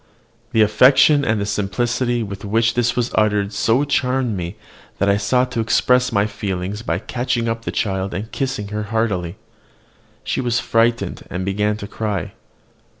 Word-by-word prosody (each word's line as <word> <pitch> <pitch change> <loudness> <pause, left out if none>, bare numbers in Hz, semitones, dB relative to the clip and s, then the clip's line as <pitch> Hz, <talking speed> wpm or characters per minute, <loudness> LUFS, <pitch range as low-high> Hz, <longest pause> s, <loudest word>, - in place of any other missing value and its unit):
The 110 - +4
affection 130 +7 +5
and 110 -5 0
simplicity 120 +4 -1
with 100 0 -7
which 115 +3 +1
this 120 0 +1
was 120 0 -1
uttered 105 -1 +1
so 115 +6 +2
charmed 130 -4 0
me, 90 +1 -5 0.4
that 100 - +1
I 100 - +3
sought 125 +4 +1
to 120 - -2
express 125 +3 +2
my 100 0 +2
feelings 100 -1 -4
by 85 -8 -1
catching 120 +3 -2
up 115 0 -3
the - - -2
child 95 -2 -1
and 105 +5 -5
kissing 130 -7 -3
her 105 0 -3
heartily. 105 -6 -1 0.9
She - - -1
was 120 -2 0
frightened, 115 +1 +1
and 90 +1 -4
began 105 +2 0
to 100 - -7
cry. 105 -4 -3
110 Hz, 160 wpm, -20 LUFS, 100-120 Hz, 0.9 s, affection